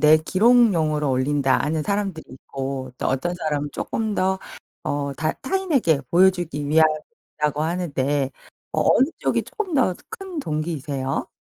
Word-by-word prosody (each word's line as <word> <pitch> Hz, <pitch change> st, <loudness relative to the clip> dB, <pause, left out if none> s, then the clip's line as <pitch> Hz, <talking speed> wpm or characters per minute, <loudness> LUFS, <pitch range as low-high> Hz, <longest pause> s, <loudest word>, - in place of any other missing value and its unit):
내 155 Hz, +1 st, +7 dB
기록용으로 170 Hz, -, +3 dB
올린다 135 Hz, +1 st, +2 dB
하는 155 Hz, +2 st, 0 dB
사람들이 200 Hz, -3 st, -2 dB
있고 130 Hz, 0 st, -6 dB
또 -, -, -1 dB
어떤 155 Hz, +7 st, -1 dB
사람은 150 Hz, -4 st, -2 dB
조금 220 Hz, -2 st, -2 dB
더 190 Hz, +1 st, +1 dB, 0.5 s
어 140 Hz, -1 st, -1 dB
다 155 Hz, -1 st, 0 dB
타인에게 275 Hz, -, +1 dB
보여주기 175 Hz, -4 st, +3 dB
위함이라고 150 Hz, -1 st, 0 dB
하는데 145 Hz, -5 st, -1 dB, 0.4 s
어 -, -, 0 dB
어느 265 Hz, -, +5 dB
쪽이 -, -, +1 dB
조금 400 Hz, -7 st, -5 dB
더 255 Hz, -9 st, +3 dB, 0.2 s
큰 380 Hz, -4 st, -7 dB
동기이세요? 150 Hz, -, -2 dB
155 Hz, 305 characters per minute, -23 LUFS, 145-190 Hz, 0.5 s, 내